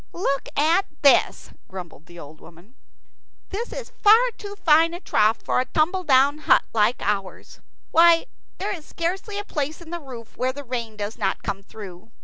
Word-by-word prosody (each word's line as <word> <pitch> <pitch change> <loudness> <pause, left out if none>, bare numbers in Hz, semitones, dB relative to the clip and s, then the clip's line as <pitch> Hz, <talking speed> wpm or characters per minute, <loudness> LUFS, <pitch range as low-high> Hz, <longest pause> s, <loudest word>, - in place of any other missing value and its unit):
"Look 275 -6 -2
at 330 +7 +3 0.2
this," 280 - +3 0.2
grumbled 180 -4 -10
the 175 0 -14
old 155 -1 -12
woman. 175 +8 -17 0.8
"This 445 +5 -5
is - - -7
far 455 +4 +6
too 405 -1 -9
fine 330 -2 +3
a - - -7
trough 220 - +2
for - - 0
a 255 - 0
tumbledown 305 -4 +2
hut - - +4
like 225 +2 +1
ours. 195 -2 -4 0.3
Why, 335 0 +5 0.3
there 410 +2 -3
is 335 -5 -8
scarcely 380 +7 -4
a 410 - -4
place 300 -2 -3
in 340 -1 -12
the 345 - -4
roof 245 -5 -11
where 255 +1 -1
the 285 +1 -8
rain 235 -4 -5
does 205 +1 -5
not 190 - -1
come 195 - -4
through. 195 -1 -11
280 Hz, 175 wpm, -23 LUFS, 210-345 Hz, 0.8 s, far